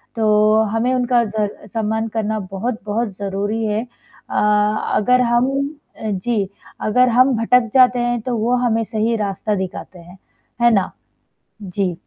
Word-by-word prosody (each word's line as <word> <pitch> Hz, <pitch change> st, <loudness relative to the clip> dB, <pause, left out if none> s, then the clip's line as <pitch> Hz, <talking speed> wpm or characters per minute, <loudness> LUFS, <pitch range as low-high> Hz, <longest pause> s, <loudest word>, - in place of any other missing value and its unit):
तो 215 Hz, 0 st, +3 dB
हमें 235 Hz, +3 st, +1 dB
उनका 245 Hz, -1 st, +2 dB
जर 210 Hz, -1 st, -4 dB
सम्मान 220 Hz, 0 st, -1 dB
करना 220 Hz, -1 st, -1 dB
बहुत-बहुत 215 Hz, +1 st, -2 dB
ज़रूरी 205 Hz, +3 st, -2 dB
है 210 Hz, +1 st, 0 dB, 0.5 s
अ, -, -, -5 dB, 0.6 s
अगर 250 Hz, +4 st, +3 dB
हम 240 Hz, +2 st, +2 dB, 0.5 s
अ, -, -, -14 dB
जी, 200 Hz, 0 st, -1 dB, 0.3 s
अगर 250 Hz, +4 st, +3 dB
हम 255 Hz, +2 st, +4 dB
भटक 235 Hz, 0 st, +3 dB
जाते 250 Hz, -1 st, +5 dB
हैं, 240 Hz, 0 st, 0 dB
तो 240 Hz, 0 st, -2 dB
वो 235 Hz, +3 st, +1 dB
हमें 225 Hz, -1 st, +1 dB
सही 225 Hz, +1 st, -1 dB
रास्ता 205 Hz, +1 st, -2 dB
दिखाते 185 Hz, -1 st, -6 dB
हैं, 175 Hz, +3 st, -14 dB, 0.5 s
है 235 Hz, -, +6 dB
ना? 195 Hz, -3 st, +1 dB, 0.7 s
जी। 185 Hz, -2 st, -2 dB
220 Hz, 145 wpm, -19 LUFS, 205-240 Hz, 0.7 s, है